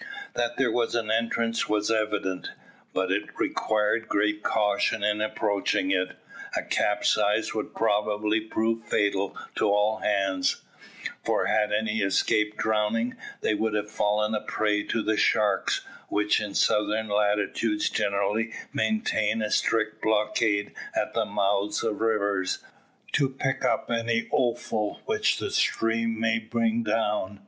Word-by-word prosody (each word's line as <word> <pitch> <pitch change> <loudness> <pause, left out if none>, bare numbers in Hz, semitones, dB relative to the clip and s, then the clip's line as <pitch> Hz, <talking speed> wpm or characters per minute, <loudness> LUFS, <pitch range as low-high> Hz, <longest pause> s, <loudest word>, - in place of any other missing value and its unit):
That 120 0 -1
there 135 -4 +2
was 120 0 0
an 110 -2 0
entrance 115 0 0
was 105 +1 +1
evident, 105 -4 -1 0.4
but 95 0 0
it 100 +2 -2
required 110 +1 0
great 105 +1 +1
caution 105 -1 +1
in 105 0 +1
approaching 100 -3 0
it. 95 -1 0 0.4
A - - -1
capsize - - +1
would - - -4
probably 105 +1 +1
prove 115 +1 -1
fatal 100 -2 0 0.2
to - - +2
all 105 +2 +2
hands 95 -3 0 0.6
for - - +1
had 105 -1 +2
any 110 +1 0
escaped 105 +2 +1
drowning, 110 +2 0 0.3
they - - +1
would 110 0 0
have 105 0 -2
fallen 105 0 +1
a 105 - 0
prey 105 -1 0
to 115 - 0
the 110 0 +1
sharks, 105 -3 +2 0.3
which 105 0 +2
in 100 -1 -5
southern 105 +1 +2
latitudes 105 - +1
generally 105 +2 0 0.2
maintain 110 - 0
a 105 - -2
strict 110 -1 +1
blockade 105 -1 +1 0.2
at - - -1
the - - +1
mouths 100 +1 0
of 110 -2 -2
rivers, 100 -4 +1 0.5
to 140 -2 +2
pick 135 0 -2
up - - 0
any 115 0 0
offal 115 -3 -1
which - - +1
the - - -3
stream 115 0 +1
may 115 0 +2
bring 115 0 0
down. 105 -3 -1
105 Hz, 140 wpm, -26 LUFS, 105-115 Hz, 0.6 s, there